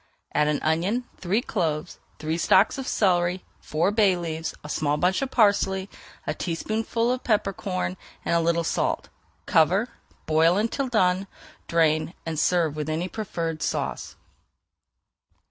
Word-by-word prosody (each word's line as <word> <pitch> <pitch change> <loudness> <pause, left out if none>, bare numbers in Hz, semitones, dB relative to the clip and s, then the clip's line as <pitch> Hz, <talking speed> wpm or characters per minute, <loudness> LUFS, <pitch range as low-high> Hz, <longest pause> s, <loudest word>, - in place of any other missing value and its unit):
Add 150 0 +3
an 150 -1 +1
onion, 180 +11 +1
three 200 +7 0
cloves, 170 - -2 0.2
three 160 +2 -2
stalks 190 +9 +4
of 265 - -5
celery, 180 -2 +1
four 165 +6 0
bay 205 -4 +3
leaves, 165 -1 -4
a - - -7
small 150 0 0
bunch 180 - +1
of 270 - -1
parsley, 200 -4 +2 0.3
a - - -1
teaspoonful 220 +7 -1
of 255 0 -2
peppercorns, 195 -4 -1 0.3
and - - +1
a 170 - +4
little 170 0 +1
salt. - - -1 0.4
Cover, 185 +9 +3 0.4
boil 160 +3 +4
until 230 +6 0
done, 190 -5 +2 0.4
drain, 160 0 +2
and 160 -2 -2
serve 165 -4 +2
with 155 0 -3
any 160 +3 -1
preferred 165 -7 -4
sauce. - - -3
180 Hz, 140 wpm, -25 LUFS, 160-205 Hz, 0.4 s, stalks